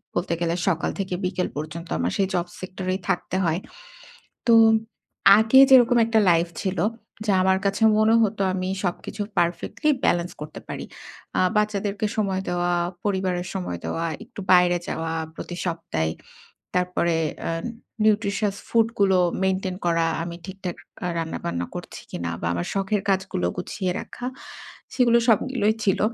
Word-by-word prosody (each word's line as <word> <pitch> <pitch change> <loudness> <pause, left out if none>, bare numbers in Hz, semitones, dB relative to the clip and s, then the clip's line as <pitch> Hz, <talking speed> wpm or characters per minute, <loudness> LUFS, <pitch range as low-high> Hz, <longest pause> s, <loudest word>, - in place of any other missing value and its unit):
বলতে 175 - 0
গেলে 170 0 +1
সকাল 170 -3 +1
থেকে 190 -1 -2
বিকেল 180 0 -1
পর্যন্ত, 155 +3 -5
আমার 85 +2 0
সেই 195 - +2
জব 175 -1 +1
সেক্টর 185 0 -6
এই - - -4
থাকতে 180 0 -1
হয়। 165 +2 +1 0.9
তো, 230 - +6 0.8
আগে 220 +4 +5
যেরকম 245 -2 +7
একটা 225 -1 +2
লাইফ 170 0 +3
ছিল, 190 -3 -2 0.5
যা 200 - +3
আমার 190 0 +3
কাছে 200 +3 0 0.2
মনে 220 +1 +4
হতো, 205 -2 0
আমি 185 0 -2 0.2
সবকিছু 195 +3 -3 0.2
পারফেক্টলি 175 - 0
ব্যালেন্স 175 +1 +1
করতে 150 0 -7
পারি। - - -5 0.5
আ - - +4 0.2
বাচ্চাদেরকে 210 0 0
সময় 195 -3 0
দেওয়া, 175 0 0 0.3
পরিবারের 185 -3 -1
সময় 180 - -3
দেওয়া, 165 - -2 0.2
একটু 230 -3 -10
বাইরে 180 -1 +5
যাওয়া, 165 0 -2 0.2
প্রতি 175 - -7
সপ্তাহে। 165 - -2 0.6
তারপরে 180 -2 +1 0.3
এন 165 +4 -3 0.4
নিউট্রিশিয়াস 205 -1 +1
ফুড 230 -1 +3
গুলো 190 -2 +4 0.3
মেইনটেইন 190 -1 0
করা, 165 -1 +2 0.2
আমি 170 0 -5
ঠিকঠাক 190 -2 -6 0.3
আ - - 0
রান্নাবান্না 85 - -3
করছি - - -7
কিনা, 85 0 -3
বা 85 - -1
আমার 85 0 -2
শখের 195 +1 0
কাজগুলো 190 - 0
গুছিয়ে 185 -3 -2
রাখা, 245 - -8 0.7
সেগুলো 235 -2 +4
সবগুলোই 220 -1 +2
ছিল। 195 - +2
185 Hz, 145 wpm, -24 LUFS, 170-205 Hz, 0.9 s, যেরকম